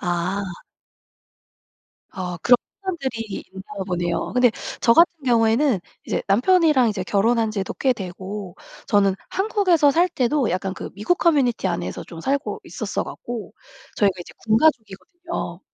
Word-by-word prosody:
아. 180 Hz, +2 st, -1 dB, 1.7 s
아 180 Hz, -2 st, -5 dB
그런 245 Hz, 0 st, +6 dB, 0.3 s
사람들이 275 Hz, -11 st, -3 dB, 0.3 s
있나 190 Hz, 0 st, -10 dB, 0.2 s
보네요. 175 Hz, -1 st, -2 dB
근데 250 Hz, -1 st, +4 dB, 0.3 s
저 230 Hz, -, +5 dB
같은 335 Hz, +7 st, +6 dB
경우에는 230 Hz, 0 st, +3 dB, 0.3 s
이제 -, -, -1 dB
남편이랑 270 Hz, -, +4 dB
이제 200 Hz, -3 st, -2 dB
결혼한 225 Hz, +3 st, +2 dB
지도 195 Hz, -3 st, -3 dB
꽤 260 Hz, -2 st, +2 dB
되고 190 Hz, -1 st, -7 dB, 0.3 s
저는 200 Hz, -2 st, +3 dB
한국에서 380 Hz, -7 st, +3 dB
살 345 Hz, +6 st, +3 dB
때도 270 Hz, -4 st, 0 dB
약간 185 Hz, +1 st, -2 dB
그 -, -, -7 dB
미국 210 Hz, -, 0 dB
커뮤니티 270 Hz, -, +2 dB
안에서 170 Hz, -, -3 dB
좀 165 Hz, -1 st, -10 dB
살고 280 Hz, -, -2 dB
있었어 -, -, -3 dB
갖고 235 Hz, -5 st, -7 dB, 0.4 s
저희가 200 Hz, -2 st, +3 dB
이제 -, -, -10 dB
군 220 Hz, 0 st, +4 dB
가족이거든요. 240 Hz, -, -1 dB
225 Hz, 300 characters per minute, -22 LUFS, 190-285 Hz, 1.7 s, 그런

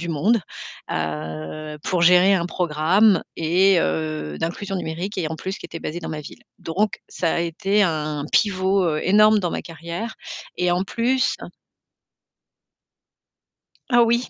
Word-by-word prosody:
du 170 Hz, -, -5 dB
monde, 195 Hz, +9 st, +2 dB, 0.5 s
heu, 80 Hz, -, -4 dB
pour 180 Hz, -3 st, 0 dB
gérer 180 Hz, +3 st, +6 dB
un 170 Hz, -2 st, 0 dB
programme 180 Hz, +4 st, +3 dB
et 180 Hz, +4 st, +3 dB
heu, 75 Hz, -1 st, -2 dB
d'inclusion 195 Hz, +4 st, -3 dB
numérique 180 Hz, +4 st, -4 dB
et 160 Hz, -, -1 dB
en 160 Hz, -, -5 dB
plus 190 Hz, +4 st, -5 dB
qui -, -, -8 dB
était 165 Hz, -, -8 dB
basé 160 Hz, -, -4 dB
dans -, -, -6 dB
ma 155 Hz, -1 st, -4 dB
ville, -, -, -12 dB, 0.2 s
donc 195 Hz, +5 st, -1 dB
ça 165 Hz, -3 st, -1 dB
a -, -, 0 dB
été 195 Hz, +5 st, +1 dB
un 155 Hz, -4 st, -1 dB
pivot, 190 Hz, -2 st, +2 dB
heu, 155 Hz, -2 st, 0 dB
énorme 215 Hz, +2 st, +5 dB
dans 175 Hz, -3 st, -1 dB
ma -, -, -3 dB
carrière 170 Hz, +7 st, -6 dB, 0.4 s
et 180 Hz, 0 st, +1 dB
en 180 Hz, +2 st, +1 dB
plus 250 Hz, +5 st, +1 dB, 2.6 s
Ah 240 Hz, -2 st, +6 dB
oui. 235 Hz, +2 st, +1 dB
175 Hz, 150 wpm, -22 LUFS, 155-195 Hz, 2.6 s, gérer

